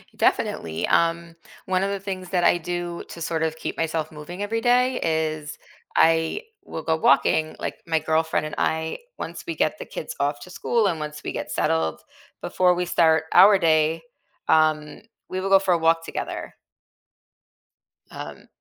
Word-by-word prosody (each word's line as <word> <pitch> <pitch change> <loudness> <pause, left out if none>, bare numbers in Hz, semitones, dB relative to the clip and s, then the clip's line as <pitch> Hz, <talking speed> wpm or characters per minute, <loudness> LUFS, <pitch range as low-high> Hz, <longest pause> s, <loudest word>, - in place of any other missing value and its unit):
Definitely, 80 -1 0
um, 170 0 +1 0.3
one 185 0 +1
of 195 - 0
the 200 0 -2
things 190 -2 -6
that 180 -2 +1
I 175 - +4
do 175 0 -4
to 170 - -9
sort 165 0 -2
of 160 -1 0
keep - - -5
myself 160 -1 -2
moving 175 +6 -7
every 225 +2 -2
day 250 +2 +3
is 155 -2 -1 0.4
I 165 - +3 0.2
will 160 - -7
go 160 +1 +1
walking, 155 +1 +3
like, - - -4
my 165 -1 +2
girlfriend 160 0 0
and 155 - -6
I, 160 0 -1 0.2
once - - -6
we - - -3
get - - 0
the - - -6
kids - - -7
off 145 +1 0
to 180 - -11
school 225 +3 0
and 170 -4 -1
once 150 0 -6
we - - -3
get - - -5
settled 80 0 0 0.4
before 180 -1 +2
we 180 0 -1
start 160 -2 +3
our 195 +3 +8
day, 160 -2 +2 0.5
um, 155 -1 +2 0.3
we 185 - -3
will 195 - -2
go 195 0 +7
for 190 -2 +1
a - - +3
walk 165 0 +2
together. - - -5 1.6
Um, - - -9
165 Hz, 175 wpm, -24 LUFS, 155-185 Hz, 1.6 s, our